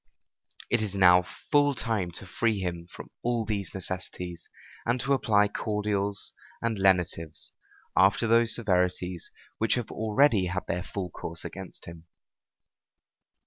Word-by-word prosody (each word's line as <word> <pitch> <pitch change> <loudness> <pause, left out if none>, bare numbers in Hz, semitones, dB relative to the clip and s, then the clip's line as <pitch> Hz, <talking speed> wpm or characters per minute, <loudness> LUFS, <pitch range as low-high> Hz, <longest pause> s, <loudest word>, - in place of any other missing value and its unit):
It 120 - +4
is 100 -2 -1
now 90 -2 +6 0.3
full 145 -1 +4
time 110 -6 0
to 100 - -7
free 110 +4 0
him 85 -2 -4
from - - -10
all 120 -2 0
these 100 -3 -2
necessities, 90 -2 -4 0.3
and 120 +2 0
to 140 - +1
apply 105 -6 +3
cordials 105 -1 -1 0.3
and 115 -3 -1
lenitives, 90 -4 +1 0.4
after 95 +5 +4
those 115 +1 +5
severities 90 -4 0 0.3
which 110 - +3
have 120 -3 -3
already 110 -2 +3
had 90 +1 -3
their 90 - -1
full 95 -2 -5
course 85 +1 -6
against 95 -2 -8
him. 85 0 -11
100 Hz, 135 wpm, -28 LUFS, 90-110 Hz, 0.4 s, now